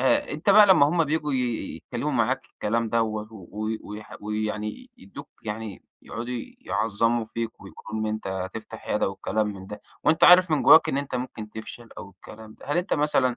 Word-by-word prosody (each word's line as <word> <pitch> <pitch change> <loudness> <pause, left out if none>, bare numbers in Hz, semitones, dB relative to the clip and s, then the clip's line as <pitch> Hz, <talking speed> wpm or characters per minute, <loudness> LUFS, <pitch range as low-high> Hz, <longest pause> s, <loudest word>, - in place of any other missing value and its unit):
آآ 130 - +2
أنت 155 +7 +1
بقى 210 +1 +8
لما 185 -7 +6
هم 165 +1 +2
بييجوا 150 0 -1
ي 125 -3 -2
يتكلموا - - -4
معاك - - 0
الكلام 115 +2 -1
دوّة 110 -1 -1
و 95 -5 -11
و 110 +1 -4 0.2
ويح 105 +1 -8
ويعني 105 - -4
يدّوك 195 - -11 0.2
يعني 105 -1 -5 0.2
يقعدوا 120 +2 -5 0.2
يعظموا 115 - 0
فيك، 115 +1 -5
ويقولوا 110 0 -7
إن - - -1
أنت 110 -1 -3
هتفتح 95 +3 -6
عيادة - - +1
والكلام 105 +2 -1
من 95 -2 -7
ده، 105 +1 -8 0.2
وأنت 160 +2 +4
عارف 180 0 +8
من 155 - +2
جواك 160 0 +8
إن 140 - 0
أنت 140 -2 -4
ممكن 125 -4 -5
تفشل 110 +2 -9
أو 100 - -9
الكلام 110 +3 -13
ده، - - -15
هل 145 - 0
أنت 180 - 0
مثلًا 135 -5 +2
115 Hz, 190 wpm, -25 LUFS, 105-145 Hz, 0.2 s, بقى